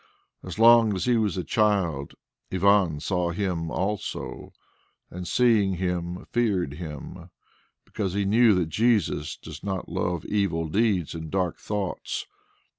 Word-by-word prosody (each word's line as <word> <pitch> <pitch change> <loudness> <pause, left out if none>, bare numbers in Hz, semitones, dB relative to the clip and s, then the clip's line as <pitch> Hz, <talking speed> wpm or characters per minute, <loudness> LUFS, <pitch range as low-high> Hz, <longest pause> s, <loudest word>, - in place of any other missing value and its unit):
As - - -8
long 115 -2 +6
as 95 - -2
he 125 - +3
was 105 -5 0
a 90 - -1
child, 90 -8 0 0.4
Ivan 95 -4 +3
saw 90 +2 -1
Him 85 -2 -2
also, 100 +5 -4 0.6
and 90 0 -6
seeing 110 -6 +3
Him 90 -1 -3
feared 100 - +1
Him, 75 -2 -8 0.6
because 95 -3 -3
he 100 0 0
knew 110 +1 +5
that 90 -3 0
Jesus 105 -8 +1
does 80 -1 -10
not 95 -2 -3
love 90 -2 -2
evil 95 -6 0
deeds 100 -2 +1
and 80 -1 -6
dark 90 -2 -1
thoughts. 100 -3 -3
95 Hz, 135 wpm, -26 LUFS, 85-105 Hz, 0.6 s, long